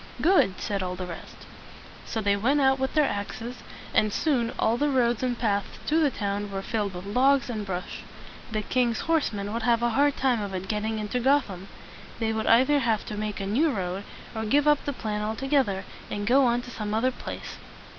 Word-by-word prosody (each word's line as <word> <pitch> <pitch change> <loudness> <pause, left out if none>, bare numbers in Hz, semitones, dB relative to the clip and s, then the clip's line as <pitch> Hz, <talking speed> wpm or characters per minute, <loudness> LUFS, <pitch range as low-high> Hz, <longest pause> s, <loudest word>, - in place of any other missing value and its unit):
"Good!" 315 - +3
said 200 -2 -2
all 180 0 -3
the 185 0 -5
rest. 170 -2 -10 0.6
So 225 - -2
they 200 -1 +2
went 255 +9 +2
out 265 -1 +3
with 265 +3 -2
their 305 -1 +5
axes, 225 +3 -4 0.4
and 215 - +3
soon 245 -3 +1
all 225 - +2
the 290 +4 +1
roads 240 -4 +2
and 250 -2 -1
paths 205 -4 -1
to 315 +2 +2
the 305 -3 +4
town 205 -3 -3
were 195 0 -4
filled 205 -4 -2
with 180 +1 -7
logs 260 +5 +3
and 215 -3 -3
brush. 185 -2 -5 0.5
The 215 -1 -1
king's 240 0 +1
horse 325 -2 +1
men 205 0 -4
would 230 - -2
have 235 0 +2
a 240 - +3
hard 285 +4 +2
time 250 -4 +2
of 200 -2 -4
it 185 +1 -4
getting 215 +2 -1
into 215 +4 -2
Gotham. 240 -8 +1 0.5
They 225 -1 0
would 220 0 -2
either 260 +5 +5
have 230 -5 0
to 210 - -4
make 210 0 -3
a 195 - -3
new 255 +12 +2
road, 190 -5 -3 0.3
or 220 - -2
give 285 +7 +2
up 295 -1 +3
the 285 - -1
plan 210 -4 -3
al 215 +1 -2
to 270 - -5
geth 270 -2 +3
er, 190 0 -3 0.3
and 205 0 -3
go 260 +5 +5
on 240 +1 +1
to 245 - -9
some 215 -2 -3
other 255 +4 +2
place. - - -7
225 Hz, 225 wpm, -26 LUFS, 205-265 Hz, 0.6 s, their